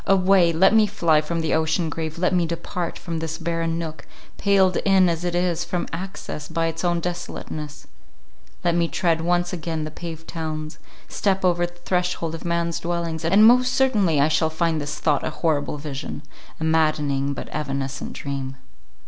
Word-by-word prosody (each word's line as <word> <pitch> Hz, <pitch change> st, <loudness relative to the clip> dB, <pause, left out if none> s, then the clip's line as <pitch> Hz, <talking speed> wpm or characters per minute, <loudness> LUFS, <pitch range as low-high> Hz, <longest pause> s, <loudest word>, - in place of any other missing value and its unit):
Away! 190 Hz, -2 st, +5 dB
let 190 Hz, +5 st, +4 dB
me 220 Hz, -1 st, +5 dB
fly 170 Hz, -6 st, +3 dB
from 165 Hz, +2 st, -2 dB
the 160 Hz, -, 0 dB
ocean 160 Hz, +2 st, +1 dB
grave, 160 Hz, 0 st, -4 dB
let 180 Hz, +2 st, +1 dB
me 175 Hz, -2 st, +2 dB
depart 170 Hz, +1 st, -4 dB
from 165 Hz, -2 st, -4 dB
this 160 Hz, 0 st, -4 dB
barren 165 Hz, 0 st, -1 dB
nook, 160 Hz, -3 st, -6 dB, 0.3 s
paled 195 Hz, -2 st, +3 dB
in, 190 Hz, -2 st, +4 dB
as 170 Hz, 0 st, -1 dB
it 175 Hz, -1 st, -1 dB
is, 175 Hz, -1 st, +1 dB
from 175 Hz, 0 st, -2 dB
access 170 Hz, -4 st, -6 dB
by 165 Hz, 0 st, -1 dB
its 165 Hz, +1 st, -3 dB
own 175 Hz, -1 st, +2 dB
desolateness; 155 Hz, -3 st, -5 dB, 0.8 s
let 170 Hz, -1 st, +2 dB
me 170 Hz, 0 st, +2 dB
tread 165 Hz, -1 st, +1 dB
once 175 Hz, +1 st, +1 dB
again 160 Hz, -2 st, -3 dB
the 155 Hz, -, -5 dB
paved 165 Hz, 0 st, -8 dB
towns; 155 Hz, -1 st, -5 dB, 0.3 s
step 195 Hz, -2 st, 0 dB
over 175 Hz, -1 st, +2 dB
the 175 Hz, -, -15 dB
threshold 175 Hz, -2 st, -1 dB
of 165 Hz, -, -6 dB
man's 170 Hz, -1 st, -1 dB
dwellings, 170 Hz, -2 st, -3 dB
and 195 Hz, +6 st, +6 dB
most 250 Hz, +2 st, +5 dB
certainly 205 Hz, -, +3 dB
I 140 Hz, -, +5 dB
shall 160 Hz, 0 st, +2 dB
find 160 Hz, -1 st, 0 dB
this 145 Hz, +1 st, -4 dB
thought 145 Hz, -3 st, +1 dB
a -, -, -1 dB
horrible 150 Hz, -3 st, -1 dB
vision—a 145 Hz, +1 st, -8 dB
maddening, 150 Hz, -3 st, +1 dB
but -, -, -6 dB
evanescent 140 Hz, -2 st, -3 dB
dream. 135 Hz, -1 st, -4 dB
165 Hz, 175 wpm, -23 LUFS, 155-175 Hz, 0.8 s, and